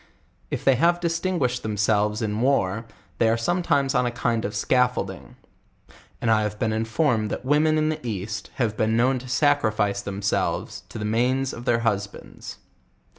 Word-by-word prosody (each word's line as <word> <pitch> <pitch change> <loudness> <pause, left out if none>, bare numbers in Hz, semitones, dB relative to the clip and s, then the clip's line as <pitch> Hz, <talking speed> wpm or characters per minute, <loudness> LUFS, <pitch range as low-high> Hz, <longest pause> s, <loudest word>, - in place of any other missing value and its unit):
If - - -4
they 135 - +6
have 170 +5 +3
distin 175 +2 -1
guished 125 -4 0
themselves 105 0 0
in 105 0 -2
war, 115 -5 +1 0.3
they 115 - +4
ore 115 - +2
sometimes 140 0 +1
on 125 -1 +2
a - - -1
kind 120 -1 -1
of 105 +1 -4
scaffolding; 125 -4 0 0.8
and 115 - +1
I 110 -1 +4
have 105 0 -3
been 110 +1 0
informed 110 0 0
that - - -5
women 155 +3 +3
in 155 0 +2
the 155 0 -4
east, 105 -2 -4
have 115 -5 0
been 110 +1 +1
known 130 +2 +2
to 130 - -11
sacrifice 115 -8 +1
themselves 100 0 -2
to - - -8
the 105 - -3
nianes 125 +4 +1
of 120 - -8
their 115 -1 +2
husbands. 100 -3 -4
115 Hz, 175 wpm, -24 LUFS, 105-135 Hz, 0.8 s, they